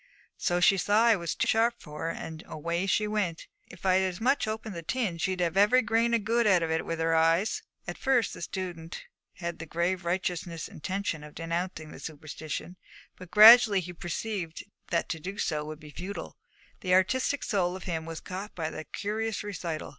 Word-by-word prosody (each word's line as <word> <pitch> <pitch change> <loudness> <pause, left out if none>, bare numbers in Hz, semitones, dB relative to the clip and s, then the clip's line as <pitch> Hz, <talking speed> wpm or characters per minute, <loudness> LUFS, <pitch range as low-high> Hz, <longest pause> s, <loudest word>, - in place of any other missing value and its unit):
So 175 0 +1
she 195 +2 +5
saw 205 +4 +3
I 230 -1 +6
was 170 -4 -3
too - - +1
sharp 230 +2 +3
for 150 +2 -7
her, - - 0
and 160 -1 -6
away 170 +4 -2
she 210 +2 +2
went. 205 -6 -2 0.2
If 180 +1 -13
I'd 185 0 +4
as 185 -2 -2
much 255 +1 +2
as - - 0
opened 220 -1 -7
the 170 - -5
tin, 185 -1 -2
she'd 185 +1 -1
have 170 -2 +1
had 195 - +4
every 230 +4 +5
grain 230 +2 +2
of 225 - 0
good 230 +1 +2
out 185 -4 +4
of 160 - -1
it 160 - -1
with 165 - -2
her 165 0 +1
eyes.' 165 +5 +3 0.2
At - - -6
first 265 -4 +2
the - - -9
student 170 -2 -5 0.3
had 175 - -10
had 170 0 -3
the 165 - -7
grave 175 +3 0
and 175 - -17
righteous 180 0 -1 0.2
intention 185 -2 -3
of 150 0 -12
denouncing 165 -1 -3
the - - -10
superstition, 155 +3 -6 0.4
but 185 -2 -12
gradually 215 0 +9
he 180 0 -6
had 175 - -16
perceived 175 -1 -4 0.3
that 170 - 0
to 160 - -3
do 195 +6 -6
so 150 -5 -1
would 155 0 -7
be 150 -1 -12
futile. 185 +6 -6 0.4
The 180 -1 +2
artistic 255 +9 +2
soul 185 -4 0
of 190 - -8
him 160 -3 -3
was 165 -1 -6
caught 190 +3 -7
by 160 -2 -3
the 155 - -7
curious 220 +1 -3
recital. 170 -6 -4
180 Hz, 215 wpm, -29 LUFS, 165-210 Hz, 0.4 s, gradually